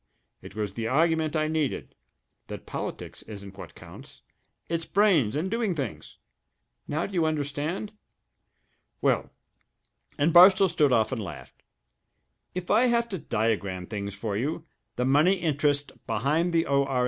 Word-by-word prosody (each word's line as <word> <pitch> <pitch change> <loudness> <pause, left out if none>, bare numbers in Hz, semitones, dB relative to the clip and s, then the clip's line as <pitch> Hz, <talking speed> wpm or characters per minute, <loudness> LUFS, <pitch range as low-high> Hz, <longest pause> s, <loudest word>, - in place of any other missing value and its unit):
It - - -12
was 105 -3 -3
the 115 +1 -3
argument 160 +3 +1
I 155 0 +1
needed 155 -3 -2 0.5
that - - -8
politics - - -6
isn't 100 -2 -10
what 100 - -11
counts - - -13 0.4
it's 165 0 -2
brains 175 - +3
and 175 +6 -2
doing 225 -5 0
things! 115 - -6 0.7
Now 155 +3 -1
do 200 - -8
you 175 -3 +2
understand? 155 +6 -3 1.1
Well" - - +1 0.9
and 155 +2 +2
Barstow 190 +2 +8
stood 150 -5 +2
off 115 -1 +2
and 125 -4 -2
laughed 95 - -10 0.9
"if 180 -1 -3
I 230 +4 +5
have 235 -1 +1
to 190 -4 -4
diagram 100 -7 -1
things 100 0 -5
for 105 0 -3
you, 150 +9 -2 0.3
the 125 - 0
money 145 +8 +4
interests 145 -5 0 0.2
behind 155 +10 +1
the 165 0 +2
O.R. 140 -2 +1
150 Hz, 145 wpm, -27 LUFS, 115-170 Hz, 1.1 s, Barstow